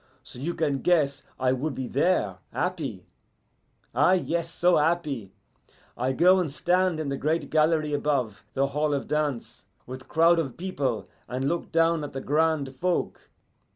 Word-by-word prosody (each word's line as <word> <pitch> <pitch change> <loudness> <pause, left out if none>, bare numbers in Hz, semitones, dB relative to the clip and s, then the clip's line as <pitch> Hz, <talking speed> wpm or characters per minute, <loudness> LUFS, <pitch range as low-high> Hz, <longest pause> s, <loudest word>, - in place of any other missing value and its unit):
So - - -9
you 170 +6 -3
can 145 -4 0
guess 150 -5 +2 0.2
I 130 -1 +2
would 135 +3 -2
be 130 -1 -4
there 120 - +1
happy. - - -3 0.9
Ah 145 +9 +4
yes, 170 -2 0
so 175 +1 +3
happy! 150 - 0 0.6
I 125 +2 0
go 180 +7 +5
and 170 -6 -1
stand 180 +2 +1
in 155 -3 -2
the 140 - -2
great 155 +4 -1
gallery 155 -1 +2
above 140 -7 -1
the 135 - +2
hall 150 +1 0
of 140 - -4
dance, 140 -6 -2 0.2
with 130 +1 -9
crowd 165 +1 +4
of 135 -7 -3
people, 135 - -2 0.2
and 130 +2 -2
look 170 +3 -2
down 165 -1 +2
at 145 - -6
the 135 - -3
grand 150 -2 +1
folk. 180 +5 -2
150 Hz, 160 wpm, -26 LUFS, 130-165 Hz, 0.9 s, go